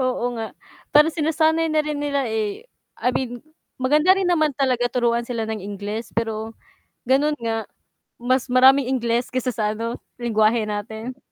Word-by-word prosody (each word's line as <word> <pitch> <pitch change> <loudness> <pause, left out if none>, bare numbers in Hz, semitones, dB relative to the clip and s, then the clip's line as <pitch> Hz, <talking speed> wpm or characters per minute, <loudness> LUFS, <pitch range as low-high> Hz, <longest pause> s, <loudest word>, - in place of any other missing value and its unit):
Oo 255 -1 0
nga, 225 -1 -6 0.3
pero 300 +2 +5
sinasanay 320 +1 +2
na 310 0 +2
rin 300 -1 -3
nila, 280 -1 0
eh, 220 - -2 0.4
I 250 - +2
mean 245 -1 -3 0.3
maganda 300 +8 +4
rin 385 - 0
naman 310 -4 +2
talaga 255 -3 +1
turuan 240 -1 0
sila 235 -2 -2
ng 220 -1 -4
Ingles 205 +3 -6
pero 225 -1 -2 0.5
ganun 285 +4 +2
nga, 225 -1 -2 0.5
mas 255 +1 +1
maraming 260 +1 +6
Ingles 240 -1 0
kaysa 255 0 0
sa 215 - -1
ano, 230 +2 -4 0.2
lengguwahe 225 -1 +2
natin. 220 +4 -5
245 Hz, 155 wpm, -22 LUFS, 225-285 Hz, 0.5 s, maraming